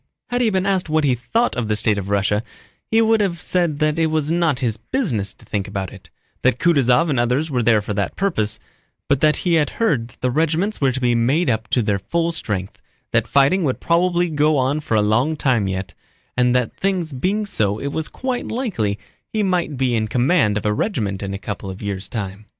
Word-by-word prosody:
Had 245 0 +1
he 235 - +3
been 190 -2 0
asked 190 -4 0
what 155 0 +2
he 135 -3 +3
thought 125 - 0
of 120 -3 -2
the 105 - +1
state 105 -1 +1
of 100 0 -6
Russia, 100 +1 +1 0.5
he 225 0 +4
would 225 -1 +3
have 180 -4 -1
said 175 -4 0
that 155 +1 +1
it 165 - +3
was 155 -1 0
not 165 -5 +2
his 115 -4 -1
business 115 - -2
to - - -19
think 100 -2 -3
about 95 -2 -4
it, - - -14 0.3
that - - +2
Kutúzov 150 -1 +3
and 130 - +1
others 125 +6 +1
were 125 -2 +1
there 110 -2 +3
for 105 - -3
that 100 -1 -2
purpose, 110 - 0 0.5
but 140 -2 +1
that 150 -1 +4
he 175 - +2
had 150 -4 +3
heard 150 - +1
that - - -21
the 125 - +1
regiments 165 - 0
were 135 -2 +3
to 130 - -3
be 125 -2 +2
made 130 +7 +2
up 110 0 -2
to 120 - +1
their 105 -1 0
full 170 - -1
strength, 100 - -4 0.3
that - - +2
fighting 140 +7 +3
would 130 -4 -1
probably 175 +1 +2
go 150 -1 +2
on 135 +3 +1
for 130 -7 -2
a 105 - +3
long 120 +9 +2
time 125 -9 +1
yet, 95 -1 -4 0.4
and 125 0 +3
that 125 -2 0
things 185 -6 -1
being 195 +11 0
so 105 - 0
it 140 +5 -4
was 160 +1 -2
quite 255 -2 -3
likely 180 - -2 0.3
he 215 -1 0
might 180 -7 0
be 130 -2 +1
in 110 -1 0
command 120 - +2
of 105 - -4
a 105 - +2
regiment 105 - -2
in 100 -1 -4
a - - -3
couple 100 -1 -6
of 95 +1 -7
years' 100 -1 -4
time. 105 -1 -5
135 Hz, 230 wpm, -21 LUFS, 110-170 Hz, 0.5 s, he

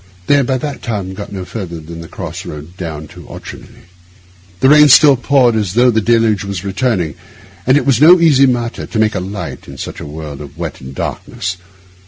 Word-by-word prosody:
They - - +3
had 135 -3 +1
by 130 - +1
that 145 +1 -5
time 100 -5 -4
got 100 +1 -8
no 95 -2 -6
farther 90 -5 -6
than 85 +1 -9
the 85 - -9
cross - - -7
road 75 +4 -9
down 80 -4 -6
to - - -13
Auchenclinny. - - -11 0.7
The 130 - +4
rain 150 0 +7
still 140 +1 +7
poured 125 -2 +3
as 105 -3 -1
though 125 +1 +5
the 110 -1 +1
deluge 115 -2 +2
were 100 0 -5
returning, 95 - -1 0.5
and 130 +2 +5
it 145 - 0
was 135 -2 +2
no 175 +4 +8
easy 140 -5 +5
matter 120 -2 -2
to - - -5
make 110 0 +2
a 95 - -2
light 95 +3 -6
in 70 - -10
such - - -7
a - - -7
world 75 -1 -8
of 70 -2 -11
wet - - -6
and 65 +1 -10
darkness. 90 +6 -4
105 Hz, 215 wpm, -15 LUFS, 85-130 Hz, 0.7 s, no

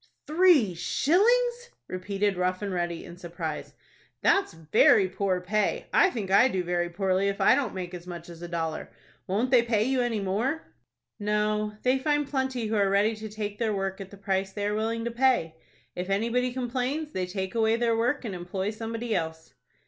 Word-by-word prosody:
"Three 310 - +4
shillings!" 475 - +2 0.2
repeated 195 +2 -1
Rough 185 +2 -1
and 200 -2 -3
Ready, 175 -1 -2
in 175 0 -11
surprise. 170 -3 -6 0.5
"That's 395 - +3
very 165 +4 +4
poor 185 -1 -1
pay. 210 +4 0
I - - +6
think 205 - -4
I 200 +6 +6
do 190 -8 -1
very 175 0 -1
poorly 190 +2 0
if 200 0 -2
I - - +6
don't 260 -8 0
make 180 -1 -5
as 180 0 -8
much 170 -2 -7
as 170 -1 -11
a 175 - -5
dollar. 165 -2 -3 0.4
Won't 220 +7 0
they 250 -3 +7
pay 225 -3 +1
you 260 +2 +1
any 240 -3 0
more?" 225 +11 -1 0.6
"No, 210 0 0
they 255 +1 +3
find 295 +1 +1
plenty 265 -4 -1
who 220 +1 -1
are 200 -2 +3
ready 205 +3 +2
to 215 0 -7
take 210 -1 -5
their 220 -3 0
work 195 0 -3
at 195 - -8
the 200 - -13
price 195 0 -1
they 205 +1 -3
are 205 - 0
willing 225 +2 -1
to 235 - -2
pay. 240 -9 +2 0.4
If 180 +2 -4
anybody 235 +5 +1
complains, 260 +5 -2
they 185 -1 -2
take 190 0 -4
away 225 -1 +2
their 230 -1 +1
work 245 +4 0
and 210 - -4
employ 185 +3 -3
somebody 225 +1 -4
else." 160 -3 -4
210 Hz, 195 wpm, -27 LUFS, 185-240 Hz, 0.6 s, they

